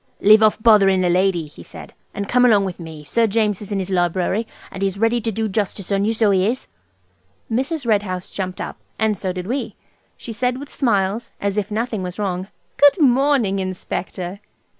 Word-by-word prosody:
"Leave 215 +2 +6
off 215 -1 +4
bothering 195 -4 +5
the 180 - +2
lady," 180 -2 +2
he 145 - -14
said, - - -11 0.2
"and 200 0 -3
come 250 +3 +3
along 210 -5 +4
of 185 - -7
me. 160 -3 -9
Sir 225 +10 +1
James 210 -2 0
is 210 - -9
in 200 - 0
his 190 0 -3
library, 185 +4 0 0.2
and 190 - -8
he's 195 0 -1
ready 225 +3 +1
to 225 - -2
do 220 +1 -1
justice 205 -1 -3
on 200 0 +1
you, 220 - +2
so 220 -2 +2
he 190 0 +2
is." 250 +4 -2 0.9
Mrs. 270 +5 -1
Red 215 -3 +3
House 185 -3 -6
jumped 185 -2 -4
up, - - -5 0.2
and 220 -1 +1
so 190 -1 -3
did 180 0 -5
we. 255 +7 -3 0.4
She 230 - -8
said 250 +3 -1
with 285 +1 -10
smiles, 215 -2 0
as 200 -1 -1
if 210 -1 -1
nothing 220 -1 -2
was 180 -1 -5
wrong– 190 -2 -2 0.3
"Good 290 +5 +5
morning, 265 -7 +3
Inspector!" 185 0 -5
200 Hz, 205 wpm, -20 LUFS, 185-225 Hz, 0.9 s, Leave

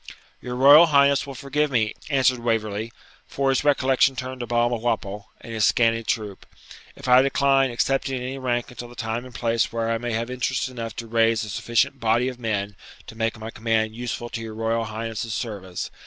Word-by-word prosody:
'Your 125 0 -5
Royal 145 +6 +8
Highness 140 -2 +3
will 135 - -7
forgive 145 +3 -1
me,' 110 -5 +1 0.2
answered 130 -3 +2
Waverley 110 -1 -2 0.4
(for 135 0 -1
his 135 - +1
recollection 135 -2 +3
turned 130 0 -6
to 120 - -5
Balmawhapple 120 -4 -1
and 115 - -9
his 110 -1 0
scanty 115 +1 +3
troop), 105 -4 -3 0.5
'if - - -9
I 125 +1 +7
decline 135 0 +3
accepting 135 +2 0
any 130 +2 -5
rank 120 -2 -2
until 120 0 -8
the 120 - -14
time 115 +1 -3
and 125 -2 -13
place 115 0 0
where 115 0 -1
I 115 - 0
may 120 0 -3
have 115 +2 -2
interest 125 +1 -1
enough 115 -3 -6
to 115 - -6
raise 115 -1 +2
a 105 - -6
sufficient 120 +6 0
body 115 +2 +2
of 125 -1 -9
men 105 -3 -2 0.3
to - - -11
make 115 0 -1
my 110 +1 -7
command 110 -1 -1
useful 120 0 -4
to 115 - -5
your 110 -1 -7
Royal 115 +1 -1
Highness's 110 0 -4
service. 100 -6 -5
120 Hz, 195 wpm, -24 LUFS, 110-130 Hz, 0.5 s, Royal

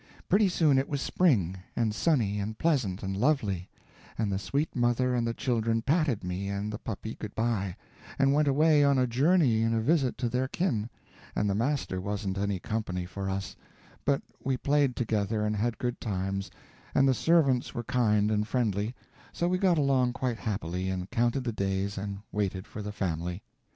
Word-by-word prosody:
Pretty 200 +2 +4
soon 155 -6 +3
it 135 - -2
was 145 - -1
spring, 110 - +2 0.2
and 110 -3 +1
sunny 105 -4 +1
and 110 +2 -4
pleasant 125 - 0
and 95 0 -2
lovely, 105 - 0 0.5
and 110 -2 0
the 95 - -1
sweet 140 +9 -2
mother 125 +1 +2
and 120 -1 +1
the 115 - -1
children 115 -2 0
patted 145 - +1
me 90 +2 -3
and 100 +2 -3
the 105 - -5
puppy 110 0 -5
good 105 - -8
by, 110 -5 -1 0.4
and 135 0 +4
went 150 +1 +3
away 150 +1 +4
on 140 -1 +4
a 130 - +3
journey 130 -1 +3
and 115 0 +2
a - - +2
visit 135 +2 +2
to 120 - -1
their 125 +3 0
kin, 125 - -1 0.5
and 105 - +1
the 100 - +1
master 115 -4 -1
wasn't 100 -1 -3
any 100 -1 0
company 95 -4 -3
for 95 +2 -4
us, 95 0 -3 0.5
but 140 -1 +1 0.2
we 130 -1 0
played 140 -2 +2
together 105 -2 0
and 105 0 0
had 115 +3 -1
good 120 -1 -3
times, 95 -2 -2 0.5
and 135 - +5
the 135 - +5
servants 140 -3 +2
were 120 - -2
kind 105 -3 +2
and 105 0 +1
friendly, 110 -2 0 0.4
so 170 - -1
we 180 +1 +1
got 185 -3 +3
along 135 -4 +2
quite 120 -2 -2
happily 95 -4 -2
and 95 0 -4
counted 120 +3 +1
the 120 -2 -2
days 100 0 -1
and 100 0 -4
waited 95 -3 -2
for 105 - -8
the 105 0 -4
family. 90 -1 -3
115 Hz, 190 wpm, -29 LUFS, 100-135 Hz, 0.5 s, and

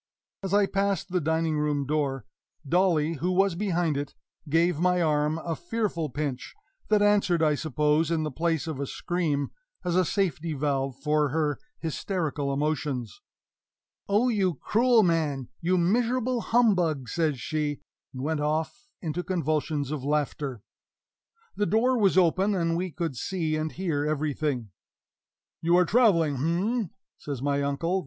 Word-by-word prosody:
As 195 -1 -4
I 205 0 +4
passed 195 -2 -1
the 180 -1 +1
dining 160 0 0
room 145 -2 0
door, 135 -4 -1 0.4
Dolly, 165 -2 +2
who 175 +6 -1
was 195 0 +3
behind 175 -5 0
it, 145 0 -5 0.3
gave 165 +1 +2
my 180 +1 +3
arm 150 -1 +1
a 165 0 -3
fearful 175 -3 -2
pinch 140 -1 -4 0.3
that 210 -1 +4
answered, 200 -5 +3
I 155 -1 +4
suppose, 150 +1 +1
in 165 -2 0
the 155 - -3
place 165 +2 0
of 155 -4 -4
a 140 - -2
scream, 155 -5 -1 0.3
as 175 -1 0
a 185 - +4
safety 170 -4 -1
valve 135 -2 -1
for 150 +1 +1
her 150 0 0 0.2
hysterical 160 -3 -2
emotions. 145 -5 -2 0.9
"Oh, 210 +5 +3
you 195 -7 +1
cruel 230 - +3
man 155 -7 0
you 180 +2 +1
miserable 240 +6 +1
humbug!" 180 - +2
says 155 -4 0
she; 150 +1 -2 0.3
and 130 0 -6
went 155 +1 -1
off 160 - -2
into 165 +1 -2
convulsions 155 -5 -1
of 150 -4 -3
laughter. 140 -4 -2 0.9
The 205 - 0
door 245 +4 +3
was 200 -5 +3
open, 190 +3 +3
and 165 -2 0
we 180 +2 -1
could 165 -4 -3
see 160 +3 -2
and 155 0 -2
hear 160 -6 -1
everything. 145 -6 -1 0.9
"You 170 +1 +3
are 180 - +5
traveling, 170 - +3
h'm?" 180 - 0 0.3
says 140 -3 -5
my 140 0 +1
uncle. 165 +7 0
160 Hz, 150 wpm, -27 LUFS, 150-185 Hz, 0.9 s, are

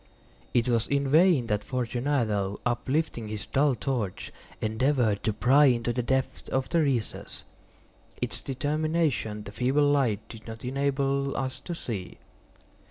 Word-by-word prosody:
It 120 0 +2
was 115 -2 +1
in 140 0 +1
vain 160 -3 +5
that 105 -2 -1
Fortunato, 120 -5 -1
uplifting 120 0 -1
his 105 -2 -5
dull 140 -1 +2
torch, 120 -8 -3 0.3
endeavored 110 -1 +1
to 110 - +1
pry 135 +7 +5
into 120 -3 +2
the 125 - 0
depths 130 +2 -1
of 130 0 -1
the 170 - +3
recess. 130 -7 -2 0.8
Its - - -2
termination 145 -5 -1
the 100 - -8
feeble 130 +6 +2
light 115 -7 +1
did 110 -1 -11
not 110 +1 -8
enable 140 +1 0
us 130 -1 -3
to 175 - -6
see. 105 - -5
130 Hz, 140 wpm, -27 LUFS, 110-140 Hz, 0.8 s, vain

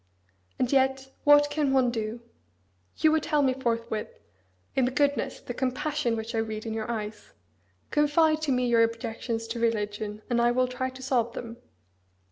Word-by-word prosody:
And 250 - 0
yet, 265 0 +2
what 290 0 +6
can 290 -2 +1
one 255 -2 +3
do? 225 0 -4 0.8
You 310 - +4
would 315 0 +2
tell 300 -2 +1
me 260 -1 +3
forthwith, 230 -4 -2 0.7
in 265 - +3
the - - +1
goodness, 280 0 0
the 245 - -6
compassion, 260 -1 -1
which 220 +2 -5
I 225 - 0
read 220 0 -3
in 225 - -3
your 220 0 -4
eyes; 215 -2 -5 0.6
Confide 310 +1 +3
to 305 -3 0
me 250 -1 +2
your 235 -1 +4
objections 230 0 -2
to 235 +1 -3
religion, 210 -2 -2
and 240 -1 +1
I 240 - +4
will 255 0 +2
try 255 +1 -3
to 260 0 -11
solve 240 -3 +1
them. 235 0 -7
245 Hz, 175 wpm, -27 LUFS, 225-270 Hz, 0.8 s, what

